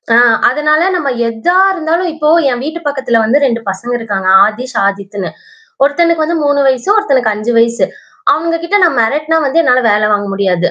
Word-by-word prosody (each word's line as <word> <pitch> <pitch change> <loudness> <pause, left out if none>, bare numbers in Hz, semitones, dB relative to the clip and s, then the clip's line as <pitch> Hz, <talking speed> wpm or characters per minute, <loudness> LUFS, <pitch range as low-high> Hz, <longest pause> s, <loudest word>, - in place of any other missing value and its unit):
ஆ - - +5 0.3
அதனால 300 +4 +1
நாம 305 -6 -2 0.2
எதா 230 +11 -1
இருந்தாலும் 345 0 -2
இப்போ 305 -1 -1 0.2
என் 245 0 -3
வீட்டு 315 +4 -5
பக்கத்தில 265 -5 0
வந்து 225 +6 +2
2 235 -3 -1
பசங்க 195 +6 -6
இருக்காங்க. 200 -4 -4 0.2
ஆதிஷ், 245 +4 -5
ஆதித்னு. 200 -1 -4 0.5
ஒருத்தனுக்கு 320 +3 +1
வந்து 335 +2 -2
3 285 0 +1
வயசு, 260 +1 0
ஒருத்தனுக்கு 265 - +1
5 215 +3 -3
வயசு. 230 +1 +1 0.5
அவுங்ககிட்ட 335 +4 -1
நான் 330 -8 +2
மிரட்டினா 300 +8 0
வந்து 280 +4 +1
என்னால 255 -4 +2
வேலை 210 +1 +2
வாங்க 205 -1 0
முடியாது. 185 -3 0
260 Hz, 170 wpm, -12 LUFS, 220-315 Hz, 0.5 s, ஆ